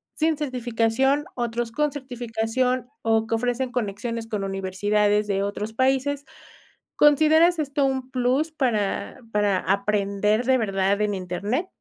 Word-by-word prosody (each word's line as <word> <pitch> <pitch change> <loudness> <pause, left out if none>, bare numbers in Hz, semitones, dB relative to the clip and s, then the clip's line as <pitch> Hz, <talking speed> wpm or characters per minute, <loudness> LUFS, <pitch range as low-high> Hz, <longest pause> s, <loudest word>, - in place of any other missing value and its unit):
sin 315 -1 +1
certificación, 255 +1 0
otros 240 -1 -2
con 295 +5 0
certificación, 250 -1 -2
o, 225 0 +2
que 230 - 0
ofrecen 245 +2 -1
conexiones 230 0 -3
con 210 -3 -3
universidades 205 +2 0
de 195 -1 0
otros 205 +2 -4
países. 270 +3 +1 0.7
¿Consideras 315 +4 +5
esto 280 -1 0
un 265 -1 -2
plus 260 +5 +1
para 235 -8 -1
para 205 -3 +2
aprender 200 +3 0
de 260 +1 +4
verdad 195 -2 0
en 210 -1 +1
internet? 200 - -2
230 Hz, 125 wpm, -24 LUFS, 210-265 Hz, 0.7 s, Consideras